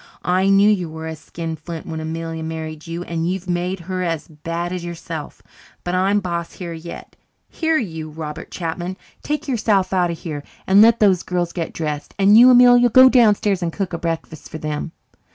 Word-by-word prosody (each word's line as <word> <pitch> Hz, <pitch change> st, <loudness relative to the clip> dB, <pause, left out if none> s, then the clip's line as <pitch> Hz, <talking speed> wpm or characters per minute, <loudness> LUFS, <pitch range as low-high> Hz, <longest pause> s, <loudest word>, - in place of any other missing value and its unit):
I 185 Hz, +2 st, +2 dB
knew 195 Hz, +1 st, +5 dB
you 185 Hz, -6 st, +1 dB
was 160 Hz, 0 st, -6 dB
a -, -, -23 dB
skinflint 165 Hz, 0 st, -6 dB
when 160 Hz, -1 st, -5 dB
Amelia 165 Hz, +1 st, -5 dB
married 160 Hz, 0 st, -6 dB
you 170 Hz, +1 st, -4 dB
and 165 Hz, -1 st, -2 dB
you've 190 Hz, 0 st, -4 dB
made 180 Hz, +1 st, -2 dB
her 185 Hz, +2 st, -4 dB
as 165 Hz, -3 st, -2 dB
bad 165 Hz, +3 st, -5 dB
as 180 Hz, -1 st, -4 dB
yourself. 165 Hz, -3 st, -7 dB, 0.4 s
But 175 Hz, -, -3 dB
I'm 195 Hz, +3 st, +2 dB
boss 170 Hz, -2 st, -4 dB
here 175 Hz, -2 st, -7 dB
yet. 165 Hz, +1 st, -9 dB, 0.3 s
Here, 320 Hz, -1 st, 0 dB
you, 160 Hz, -, -4 dB
Robert 155 Hz, -1 st, -7 dB
Chapman, 175 Hz, +2 st, -4 dB, 0.2 s
take 300 Hz, 0 st, -3 dB
yourself 210 Hz, -7 st, +1 dB
out 180 Hz, -2 st, +2 dB
of 170 Hz, -, -4 dB
here 155 Hz, -4 st, -6 dB, 0.2 s
and 195 Hz, +2 st, +6 dB
let 230 Hz, +1 st, +6 dB
those 190 Hz, -4 st, +4 dB
girls 175 Hz, -1 st, -2 dB
get 170 Hz, -3 st, -3 dB
dressed. 150 Hz, -2 st, -5 dB
And 200 Hz, +1 st, +5 dB
you, 245 Hz, +3 st, +9 dB
Amelia, 245 Hz, -1 st, +7 dB
go 260 Hz, +3 st, +8 dB
downstairs 210 Hz, -6 st, +3 dB
and 170 Hz, -1 st, -1 dB
cook 190 Hz, 0 st, -4 dB
a 170 Hz, -, -3 dB
breakfast 165 Hz, -2 st, -5 dB
for 160 Hz, -, -6 dB
them." 155 Hz, +1 st, -4 dB
175 Hz, 190 wpm, -20 LUFS, 160-195 Hz, 0.4 s, you